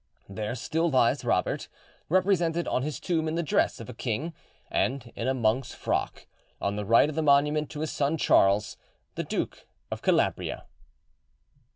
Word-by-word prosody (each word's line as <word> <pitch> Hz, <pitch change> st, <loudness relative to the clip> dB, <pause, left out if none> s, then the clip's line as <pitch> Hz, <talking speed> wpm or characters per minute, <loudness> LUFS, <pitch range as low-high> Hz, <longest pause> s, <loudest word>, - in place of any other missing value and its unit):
There 105 Hz, +4 st, -4 dB
still 165 Hz, +7 st, 0 dB
lies 130 Hz, -5 st, +3 dB
Robert, -, -, 0 dB, 0.4 s
represented 175 Hz, -2 st, +2 dB
on -, -, 0 dB
his 150 Hz, +2 st, -3 dB
tomb 165 Hz, -3 st, 0 dB
in 155 Hz, -, -1 dB
the 170 Hz, -, 0 dB
dress 150 Hz, -, +1 dB
of 115 Hz, -, -8 dB
a 125 Hz, -, -7 dB
king 130 Hz, +8 st, -3 dB, 0.4 s
and 125 Hz, -2 st, -1 dB
in 115 Hz, -, -3 dB
a 130 Hz, -, +1 dB
monk's 120 Hz, +1 st, 0 dB
frock, -, -, -2 dB, 0.3 s
on 100 Hz, 0 st, -1 dB
the 105 Hz, 0 st, -3 dB
right 115 Hz, +7 st, +5 dB
of 155 Hz, -, -4 dB
the 160 Hz, -, -1 dB
monument 150 Hz, +1 st, +3 dB
to 150 Hz, -, -6 dB
his 155 Hz, -, -2 dB
son 145 Hz, +3 st, 0 dB
Charles, 100 Hz, -6 st, +3 dB, 0.4 s
the -, -, -3 dB
Duke -, -, -4 dB, 0.2 s
of -, -, -4 dB
Calabria. -, -, 0 dB
140 Hz, 170 wpm, -27 LUFS, 115-160 Hz, 0.4 s, right